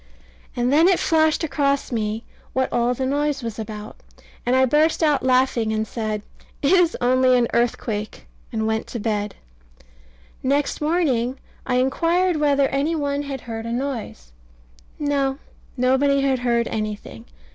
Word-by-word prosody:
And 245 +2 +1
then 320 +4 +6
it 375 -2 +4
flashed 315 0 +2
across 280 -3 0
me 220 -1 -2 0.3
what 260 0 0
all 240 +1 +2
the 260 - -2
noise 285 0 0
was 230 -1 -5
about; 210 -1 -7 0.5
and 250 - +3
I 260 0 +5
burst 305 +5 +2
out 295 -3 +3
laughing 255 -3 +2
and 220 0 -1
said 215 -2 -3 0.4
"It 280 - +3
is 360 -3 +4
only 255 +1 +4
an 240 -1 +2
earthquake," 225 -3 -1 0.3
and 220 -1 -1
went 220 0 -1
to 235 - -5
bed 210 -1 -2 1.1
Next 280 +3 0
morning 275 -6 +1 0.3
I 250 - +1
inquired 335 +7 +2
whether 285 -2 +3
any 285 +5 0
one 285 -2 -1
had 275 -3 -5
heard 225 -1 -6
a - - -3
noise. 235 - -4 0.7
No, 280 -2 0 0.4
nobody 265 +3 +3
had 270 -2 +1
heard 235 -1 +1
anything. 210 - -5
260 Hz, 150 wpm, -22 LUFS, 230-285 Hz, 1.1 s, then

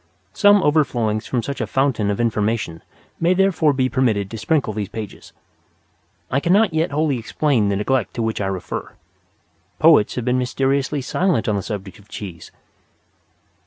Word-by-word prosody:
Some 205 -1 +5
overflowings 120 -8 +1
from 120 -3 -1
such 140 +1 -4
a 110 - -2
fountain 130 -4 0
of 100 - -1
information 110 -6 -1 0.4
may 175 +2 +2
therefore 180 -5 +3
be 130 -2 +1
permitted 115 -7 0
to 115 - -5
springle 140 -5 0
these 100 -2 -4
pages. 110 -3 -8 1.0
I 135 - +2
cannot 185 +4 +3
yet 160 +2 +1
wholly 145 -3 0
explain 115 -2 0
the 100 - 0
neglect 105 -1 -1
to 115 - -1
which 110 -1 -2
I 95 - -1
refer. 95 -2 -5 0.8
Poets 105 - +5
have 125 - -3
been 125 0 +1
mysteriously 135 +2 0
silent 175 - 0
on 105 - +1
the 100 - -1
subject 100 0 -7
of 105 0 -21
cheese. 90 -7 -8
125 Hz, 160 wpm, -21 LUFS, 105-145 Hz, 1.0 s, Some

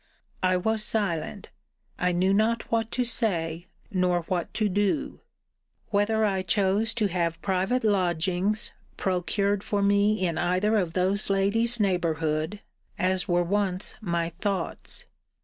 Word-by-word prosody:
I 185 0 +3
was 220 +3 0
silent. 200 -3 -2 0.5
I 180 0 +2
knew 185 +2 +2
not 220 +3 +1
what 225 -1 +1
to 250 - +1
say, 175 -8 -1 0.2
nor 180 -2 +2
what 175 0 -3
to 215 - +2
do. 205 +9 0 0.7
Whether 215 +1 +2
I 195 -2 +1
chose 200 +4 +1
to 225 -3 +1
have 170 -3 -1
private 195 +6 0
lodgings 185 0 +1 0.3
procured 195 +2 0
for 205 -4 0
me 200 0 +3
in 165 -2 -1
either 185 +5 +1
of 180 -6 0
those 190 +4 +1
ladies' 225 +5 +2
neighbourhood, 165 -2 0 0.4
as 185 0 +1
were 175 0 +2
once 190 +1 -1
my 170 -4 -1
thoughts? 185 +1 -3
195 Hz, 130 wpm, -26 LUFS, 175-210 Hz, 0.7 s, I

